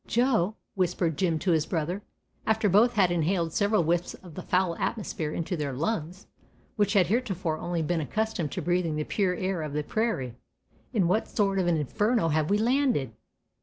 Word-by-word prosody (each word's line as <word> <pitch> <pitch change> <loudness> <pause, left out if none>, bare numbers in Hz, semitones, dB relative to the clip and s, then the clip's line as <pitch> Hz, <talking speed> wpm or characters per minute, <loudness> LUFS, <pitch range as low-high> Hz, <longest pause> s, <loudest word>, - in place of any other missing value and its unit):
"Joe," 225 -5 +2 0.2
whispered 180 -3 0
Jim 165 0 +1
to 175 +3 0
his 160 -2 +2
brother, 175 +4 -2 0.5
after 220 -1 +2
both 215 +6 +5
had 190 -5 +3
inhaled 170 0 0
several 205 -2 +2
whiffs 170 +2 0
of 180 -4 -14
the 185 - -6
foul 180 -1 +1
atmosphere 195 -8 -2
into 170 +3 -2
their 145 -4 -3
lungs, 165 - -3 0.5
which 205 0 +2
had 195 -4 +5
heretofore 190 -7 -1
only 175 -2 -2
been 165 +1 0
accustomed 215 -2 -2
to - - -3
breathing 175 -3 +1
the 150 - -1
pure 185 +2 0
air 185 -2 -2
of 155 -2 -4
the 150 0 -1
prairie, 180 - -1 0.6
"in 205 -9 +2
what 210 +6 +1
sort 195 -2 +1
of 180 - +1
an 170 -2 +3
inferno 210 - +1
have 155 0 +1
we 205 - +3
landed?" 235 - +1
180 Hz, 185 wpm, -27 LUFS, 160-210 Hz, 0.6 s, both